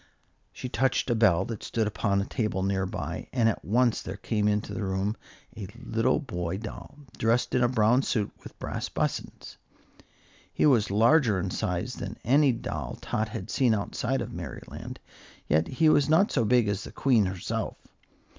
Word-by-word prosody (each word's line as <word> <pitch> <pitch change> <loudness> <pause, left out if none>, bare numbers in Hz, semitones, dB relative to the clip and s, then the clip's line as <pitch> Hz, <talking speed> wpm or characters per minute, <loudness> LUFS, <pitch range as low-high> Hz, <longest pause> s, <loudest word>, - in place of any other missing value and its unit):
She - - -6
touched 125 +1 +1
a - - +4
bell 110 -7 +3
that 115 -3 -6
stood 115 -2 -1
upon 100 -1 0
a - - -2
table 105 -6 -2
near 95 -1 0
by, - - -5
and 120 -3 +2
at 115 - -1
once 120 +3 +2
there 95 +2 -6
came 105 -1 0
into 105 0 0
the - - -3
room 95 +2 -1 0.4
a 105 -4 -6
little 120 0 +1
boy 90 - -3
doll, 110 +6 -9 0.2
dressed 115 +2 +1
in 125 - +3
a - - +5
brown 120 +1 +3
suit 110 -6 -1
with - - -12
brass - - -4
buttons. - - -4 0.9
He - - +1
was 120 -8 +4
larger 115 +1 +4
in 95 0 -2
size 90 +9 -2
than 100 0 -6
any 140 +2 +4
doll 115 - -5
Tot 110 0 -2
had 110 -4 -6
seen 120 -5 +3
outside 100 - -2
of - - -5
Merryland, - - -8 0.5
yet 80 +2 +2
he 155 +5 +2
was 145 -2 +4
not 175 +7 +4
so 120 -5 +1
big 120 -1 +3
as 100 0 -1
the - - -9
Queen 120 -8 +3
herself. 95 -1 -3
110 Hz, 180 wpm, -27 LUFS, 100-125 Hz, 0.9 s, a